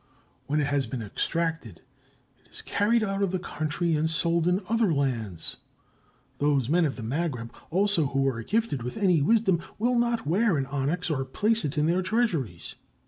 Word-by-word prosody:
When 150 +2 +1
it 145 - +2
has 140 -1 0
been 125 -4 -4
extracted, 160 - -3 0.6
it - - -28
is - - -5
carried 220 +3 +2
out 195 -1 -1
of 200 - +2
the 185 - -1
country 160 0 -2
and 155 +1 +1
sold 170 +1 +1
in 180 +3 +1
other 225 -2 +2
lands. 120 - -2 0.8
Those 140 -4 +2
men 170 +2 +3
of 140 - -1
the 115 - -7
Magreb 125 -2 -2 0.2
also 190 -3 +2
who 135 0 +1
are 115 -4 -1
gifted 215 - -1
with 125 - -5
any 185 -7 +3
wisdom 190 0 +3 0.2
will 240 +3 +2
not 235 -4 0
wear 185 +3 +2
an 135 - 0
onyx 145 +6 -1
or 135 -3 0
place 215 +11 +1
it 145 +1 -3
in 150 - +3
their 175 +3 +2
treasuries. 180 - -1
160 Hz, 185 wpm, -27 LUFS, 135-195 Hz, 0.8 s, men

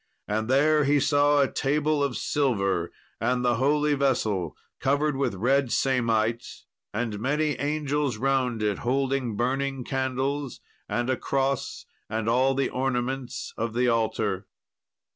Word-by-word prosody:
And 110 +1 -1
there 150 +4 +4
he 145 +1 +3
saw 145 +1 +3
a 135 - +3
table 150 +1 +1
of 140 -3 -1
silver, 100 - 0 0.3
and 125 0 0
the 120 -1 +2
holy 150 +3 +2
vessel 110 - 0 0.2
covered 145 +2 +1
with 135 -7 -1
red 130 +5 +1
samite, 115 -3 0 0.3
and 110 -1 -3
many 150 +6 +1
angels 145 -3 -1
round 130 -3 0
it 105 -2 0
holding 130 -2 0
burning 135 +3 -1
candles 135 +1 -2 0.3
and 120 0 -1
a 130 - 0
cross 135 0 -1 0.2
and 110 +1 -2
all 130 +3 +3
the 135 0 +1
ornaments 130 0 -2
of 115 0 -3
the 125 0 +2
altar. 110 -4 0
130 Hz, 135 wpm, -26 LUFS, 115-140 Hz, 0.3 s, there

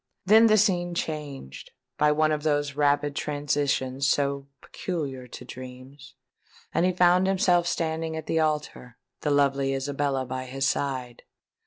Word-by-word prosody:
Then 220 +4 +7
the 215 -1 +5
scene 175 -4 +1
changed, 145 - -5 0.3
by 150 0 +4
one 155 +1 +2
of 150 -1 -1
those 145 -2 0
rapid 145 0 +1
transitions 140 -2 -1
so 140 0 0
peculiar 140 -8 -5
to - - -10
dreams; 130 +1 -11 0.6
and 170 +3 +2
he - - +2
found 180 +1 +4
himself 180 -2 +2
standing 160 -1 -2
at 160 - -6
the 160 - 0
altar, 150 -6 -2 0.2
the 150 - -2
lovely 140 -1 +2
Isabella 135 -1 -1
by 130 0 -5
his 135 +1 -1
side. 130 -4 -2
145 Hz, 145 wpm, -26 LUFS, 135-160 Hz, 0.6 s, Then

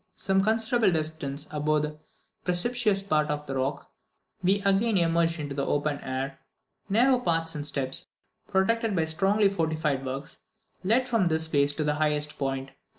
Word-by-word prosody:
Some 195 0 +1
considerable 225 0 +2
distance 155 -3 -2
above 150 0 +1
the 150 0 -5 0.4
precipitous 205 +2 +1
part 155 -6 +1
of 150 0 -2
the 135 - -5
rock, 135 +2 -2 0.5
we 190 +2 +3
again 200 +2 +3
emerged 165 -1 +2
into 145 -2 -4
the 140 0 -2
open 145 0 0
air; 135 +1 -4 0.5
narrow 245 +5 +4
paths 165 -6 0
and 150 -2 -4
steps, 135 -3 -2 0.4
protected 215 +3 +1
by 165 -2 +2
strongly 195 +6 +2
fortified 160 -7 -1
works, 135 +2 -6 0.4
led 235 +7 +2
from 230 -7 +2
this 160 -1 +1
place 145 -2 +2
to 155 - -2
the 150 0 +1
highest 150 0 0
point. 135 -1 -2
160 Hz, 155 wpm, -27 LUFS, 145-195 Hz, 0.5 s, narrow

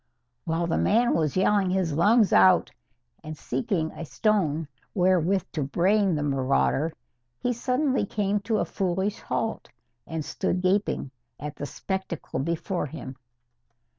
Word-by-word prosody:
While 165 +1 0
the 165 - 0
man 235 +4 +3
was 155 0 0
yelling 195 0 +3
his 180 -4 0
lungs 205 +6 +4
out 95 -1 +5 0.5
and 155 0 -7
seeking 160 - -2
a - - -7
stone 165 -4 0 0.3
wherewith 185 0 +3
to 155 - -3
brain 185 +6 +2
the 150 - -1
marauder, 135 +2 +1 0.5
he 245 - -1
suddenly 255 -1 0
came 205 0 0
to 215 +2 -1
a - - +1
foolish 190 +2 -1
halt, 225 0 -3 0.4
and 160 -2 -4
stood 180 +1 -2
gaping 185 -7 0 0.3
at 150 +1 -6
the 145 - -5
spectacle 190 -5 -4
before 170 +3 -2
him. 130 -1 -8
180 Hz, 135 wpm, -26 LUFS, 155-205 Hz, 0.5 s, out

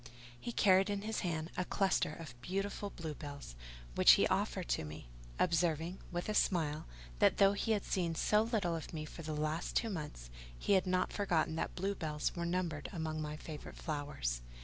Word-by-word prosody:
He 240 - -4
carried 195 -3 +5
in 200 0 -1
his 220 +1 -1
hand 165 -2 -2
a 180 - 0
cluster 190 -3 +1
of 155 -5 -8
beautiful 195 +5 -2
bluebells, 145 - -7 0.4
which - - +8
he - - +5
offered - - 0
to - - +1
me; 75 -5 -8 0.3
observing, 170 0 +1
with 175 0 -2
a 215 - 0
smile, 160 -7 +1 0.3
that - - +5
though 195 0 +6
he 220 +2 +1
had 205 - -1
seen 170 -3 0
so 210 +5 +4
little 215 -7 0
of 160 - -6
me 155 -1 -3
for 160 - -9
the 155 -1 -3
last 155 +2 -1
two 225 -1 +2
months, 150 - -6 0.3
he 200 - +1
had 190 -1 +4
not 185 0 +1
forgotten 170 -5 +1
that - - -2
bluebells 175 -6 -1
were 170 -1 -1
numbered 170 -4 -1
among 160 -3 -2
my 150 0 -4
favourite 155 -1 -8
flowers. 145 - -2
170 Hz, 185 wpm, -35 LUFS, 150-190 Hz, 0.4 s, which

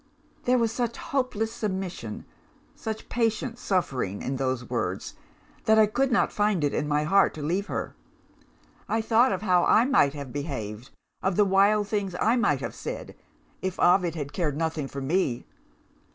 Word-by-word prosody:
"There 250 +1 +4
was 230 -2 +1
such 235 -1 -2
hopeless 250 -5 -1
submission, 185 - -4 0.5
such 220 -1 -6
patient 230 +1 -1
suffering, 135 - -1
in 135 0 -2
those 130 -2 -2
words, - - -3 0.5
that 220 0 +5
I 220 - +7
could 255 +6 0
not 235 - +2
find 205 -5 +1
it 145 - +1
in 150 - -1
my 150 0 +1
heart 195 +5 +3
to 155 - -6
leave 185 +7 -1
her. - - -4 0.9
I 225 - +1
thought 230 +3 +4
of - - -2
how 180 -3 +4
I 225 - +5
might 155 - +3
have 140 -4 -7
behaved, 130 -6 -5 0.3
of 190 -1 0
the 210 - +4
wild 200 +2 +3
things 200 -4 -2
I 225 +3 +3
might 240 - +2
have - - -4
said, - - -6 0.5
if 185 -1 -3
Ovid 175 -2 +4
had 145 -3 -5
cared 150 -6 -1
nothing 160 -3 -1
for 140 0 -6
me. 135 -3 0
190 Hz, 170 wpm, -26 LUFS, 145-220 Hz, 0.9 s, I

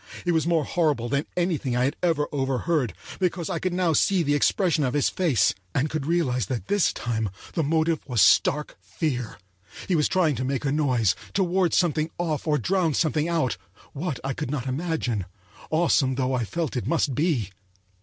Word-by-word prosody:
It 175 - +2
was 160 -1 +1
more 165 -4 +2
horrible 150 -9 0
than 140 +2 -1
anything 160 -8 0
I 125 - +2
had 135 - 0
ever 160 -4 +1
overheard, 135 - 0 0.3
because 180 -2 -1
I - - -1
could 185 - -1
now 175 -2 +1
see 185 +3 +3
the 145 -1 +1
expression 165 +1 +2
of 130 0 -1
his 145 - +2
face, 165 -10 +2 0.2
and 145 +3 +1
could 155 -3 -3
realize 130 - +1
that 125 +5 -4
this 205 -2 +3
time 110 -3 -2 0.2
the 165 - 0
motive 160 +1 +1
was 125 -4 -1
stark 140 +10 +3
fear. 125 -8 -3 0.5
He 185 - +2
was 150 -2 +3
trying 165 -6 +2
to 130 - -2
make 135 +2 -2
a 135 - +1
noise; 125 -9 +2 0.2
to 195 - +3
ward 180 0 +1
something 160 -3 +1
off 160 -3 -2
or 150 -1 +3
drown 175 -3 +1
something 155 0 +1
out—what, 135 - -3
I 135 0 -2
could 125 - -4
not 135 -3 -3
imagine, 130 - -2 0.4
awesome 155 -5 +2
though 130 0 0
I 125 -2 0
felt 165 +4 -3
it 125 - -2
must 160 -4 +1
be. 135 - 0
150 Hz, 190 wpm, -25 LUFS, 130-170 Hz, 0.5 s, see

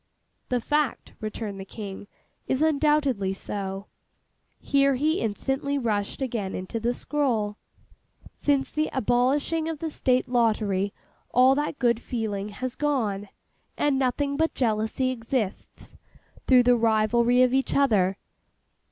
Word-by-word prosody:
'The 250 - +1
fact,' 295 +2 -1
returned 215 -2 -5
the - - -5
King, 200 0 -8 0.4
'is 265 +3 +1
undoubtedly 290 -9 +2
so.' 195 0 -5 0.7
Here 275 -1 +2
he 310 +7 +1
instantly 270 +6 -1
rushed 215 -1 -1
again 225 -7 -3
into 185 +5 -4
the 235 +2 0
scroll. 240 -7 -1 0.8
'"Since 275 -2 0
the 310 0 0
abolishing 265 +6 +1
of 325 - -3
the 320 +1 -4
State 255 -3 +1
Lottery 215 -5 +1 0.4
all 255 +2 +5
that 290 +1 -2
good 235 -2 +2
feeling 210 -4 -3
has 250 +4 -4
gone, 220 -10 -1 0.5
and 285 -2 +2
nothing 280 +2 0
but 320 +1 +1
jealousy 225 +2 0
exists, 230 -4 -4 0.5
through 255 -2 +6
the 245 0 +5
rivalry 235 +2 +3
of 250 0 +2
each 270 0 +1
other. 205 -9 +3
245 Hz, 125 wpm, -26 LUFS, 215-275 Hz, 0.8 s, through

